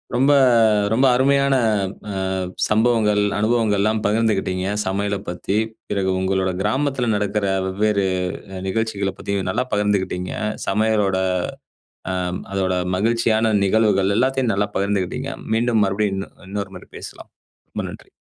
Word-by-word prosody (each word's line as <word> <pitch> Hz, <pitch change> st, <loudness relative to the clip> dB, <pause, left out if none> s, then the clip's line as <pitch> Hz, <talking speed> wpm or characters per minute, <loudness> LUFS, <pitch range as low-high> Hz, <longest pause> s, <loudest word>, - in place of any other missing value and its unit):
ரொம்ப, 135 Hz, +3 st, +4 dB, 0.6 s
ரொம்ப 130 Hz, +4 st, +3 dB
அருமையான 140 Hz, +1 st, +3 dB, 0.6 s
அ -, -, -4 dB, 0.5 s
சம்பவங்கள், 110 Hz, -2 st, +3 dB, 0.2 s
அனுபவங்கள்லாம் 110 Hz, -1 st, +1 dB
பகிர்ந்துகிட்டீங்க 105 Hz, -4 st, +1 dB, 0.2 s
சமையல 100 Hz, +1 st, -1 dB
பத்தி. 90 Hz, +4 st, -2 dB, 0.3 s
பிறகு 95 Hz, -2 st, 0 dB
உங்களோட 95 Hz, 0 st, 0 dB
கிராமத்துல 130 Hz, +2 st, 0 dB
நடக்கற 105 Hz, 0 st, -1 dB, 0.2 s
வெவ்வேறு 100 Hz, +1 st, +1 dB, 0.5 s
அ -, -, -5 dB
நிகழ்ச்சிகள 100 Hz, -2 st, -1 dB
பத்தி, 100 Hz, 0 st, -2 dB
நல்லா 125 Hz, -, 0 dB
பகிர்ந்துகிட்டீங்க. 100 Hz, -3 st, 0 dB, 0.4 s
சமையலோட 105 Hz, -2 st, +2 dB, 1.0 s
அ -, -, -1 dB, 0.4 s
அதோட 95 Hz, -1 st, 0 dB, 0.2 s
மகிழ்ச்சியான 110 Hz, +1 st, +2 dB
நிகழ்வுகள் 100 Hz, -1 st, +2 dB
எல்லாத்தையும், 130 Hz, -1 st, +1 dB
நல்லா 105 Hz, +1 st, 0 dB
பகிர்ந்துகிட்டீங்க. 100 Hz, +7 st, -1 dB, 0.2 s
மீண்டும் 115 Hz, -1 st, +2 dB
மறுபடியும் 100 Hz, 0 st, 0 dB
இன் 100 Hz, -, -5 dB, 0.2 s
இன்னொரு 100 Hz, -1 st, -4 dB
முறை 90 Hz, -, -12 dB
பேசலாம். -, -, -10 dB, 0.4 s
ரொம்ப -, -, -4 dB
நன்றி. -, -, -12 dB
105 Hz, 115 wpm, -21 LUFS, 95-115 Hz, 1.0 s, ரொம்ப